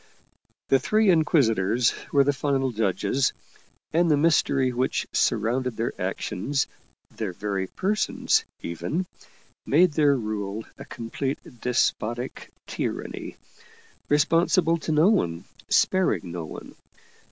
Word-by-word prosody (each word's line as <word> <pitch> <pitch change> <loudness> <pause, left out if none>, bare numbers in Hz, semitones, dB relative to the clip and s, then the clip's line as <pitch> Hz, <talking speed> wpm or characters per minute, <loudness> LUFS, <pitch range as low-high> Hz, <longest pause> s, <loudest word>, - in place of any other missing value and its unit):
The 135 - +5
Three 215 +3 +3
Inquisitors 120 - +3 0.2
were 140 -1 +5
the 145 +1 +2
final 135 -1 0
judges, 110 +5 0 0.6
and 170 +1 +3
the 150 - +4
mystery 140 -4 +2
which 125 +2 0
surrounded 120 +2 0
their 115 +1 -1
actions, 135 +9 -1 0.5
their 105 -5 -3
very 95 0 -3
persons 205 - 0 0.2
even, 150 - -3 0.6
made 170 +5 +4
their 145 -2 +3
rule 105 -1 -4
a - - -8
complete 130 +4 -4 0.2
despotic 120 0 -1 0.2
tyranny, - - -4 0.7
responsible 165 +3 +3
to 160 - -3
no 155 +5 +5
one, 85 - 0 0.3
sparing 105 - +2
no 85 -1 -5
one. - - -10
130 Hz, 110 wpm, -25 LUFS, 110-155 Hz, 0.7 s, The